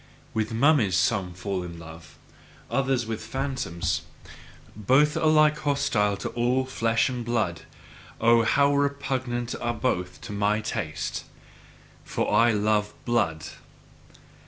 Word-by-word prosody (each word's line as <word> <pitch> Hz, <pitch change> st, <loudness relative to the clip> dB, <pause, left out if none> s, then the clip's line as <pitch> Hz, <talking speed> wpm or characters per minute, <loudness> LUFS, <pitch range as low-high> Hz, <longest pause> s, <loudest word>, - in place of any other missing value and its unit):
With 110 Hz, -1 st, -1 dB
mummies, 115 Hz, -, +3 dB
some 90 Hz, -1 st, 0 dB
fall 95 Hz, 0 st, -3 dB
in 85 Hz, -1 st, -7 dB
love; 80 Hz, -1 st, -12 dB, 0.5 s
others 135 Hz, -3 st, +1 dB
with 110 Hz, -1 st, -4 dB
phantoms: 90 Hz, -, -2 dB, 0.7 s
both 135 Hz, +9 st, +3 dB
alike 155 Hz, -1 st, +4 dB
hostile 105 Hz, -8 st, +1 dB
to -, -, -4 dB
all 125 Hz, +2 st, 0 dB
flesh 115 Hz, -3 st, +1 dB
and 125 Hz, -2 st, -3 dB
blood 110 Hz, -8 st, -1 dB, 0.6 s
oh, 115 Hz, +1 st, +5 dB
how 140 Hz, +6 st, +3 dB
repugnant 130 Hz, -4 st, -1 dB
are 120 Hz, 0 st, -1 dB
both 90 Hz, -7 st, -2 dB
to -, -, -8 dB
my 105 Hz, +1 st, +1 dB
taste! 105 Hz, -, -4 dB, 0.8 s
For -, -, -2 dB
I 115 Hz, +3 st, +5 dB
love 105 Hz, 0 st, 0 dB
blood. 85 Hz, -11 st, 0 dB
115 Hz, 120 wpm, -26 LUFS, 100-130 Hz, 0.8 s, oh